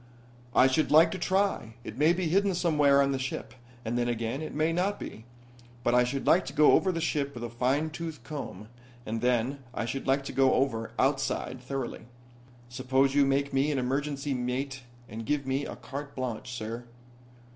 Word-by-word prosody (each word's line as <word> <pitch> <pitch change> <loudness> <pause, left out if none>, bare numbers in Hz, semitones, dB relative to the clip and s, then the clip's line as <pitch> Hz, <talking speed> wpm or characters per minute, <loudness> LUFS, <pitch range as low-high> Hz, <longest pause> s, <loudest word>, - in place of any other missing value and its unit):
"I - - +7
should 130 +4 +2
like 160 +2 +6
to 190 - -4
try. 185 - 0
It 110 - -7
may 150 +5 +4
be 175 0 0
hidden 195 +3 +2
somewhere 150 -5 +4
on 140 - +1
the 135 - -1
ship, 130 0 -4 0.3
and 120 +2 -1
then 120 - +1
again, 120 +3 -2
it 155 - -5
may 155 +2 +1
not 190 +4 0
be. 110 - -8 0.6
But 120 - +2
I 125 0 +5
should 135 +2 -3
like 180 - +5
to - - -5
go 150 - +6
over 190 - +4
the 165 - -3
ship 145 -4 -1
with 120 - -6
a 120 - -5
fine 135 +6 0
tooth 160 -5 -6
comb, 110 -6 -7 0.4
and 110 +1 -3
then 125 +3 +1 0.2
I - - -1
should 135 +4 -4
like 135 +1 +2
to - - -5
go 135 -1 +4
over 115 -4 0
outside, 135 -2 0
thoroughly. 130 -3 -5 0.6
Suppose 130 +2 +1
you 145 0 +5
make 140 +1 +1
me 135 +3 +2
an 145 - -1
emergency 140 +2 -1
mate 130 +2 -3 0.3
and 110 +1 -7
give 140 +4 -1
me 135 +2 -1
a - - -6
carte 140 +1 -7
blanche, 125 -2 -4
sir." 115 0 -5
135 Hz, 200 wpm, -29 LUFS, 125-150 Hz, 0.6 s, I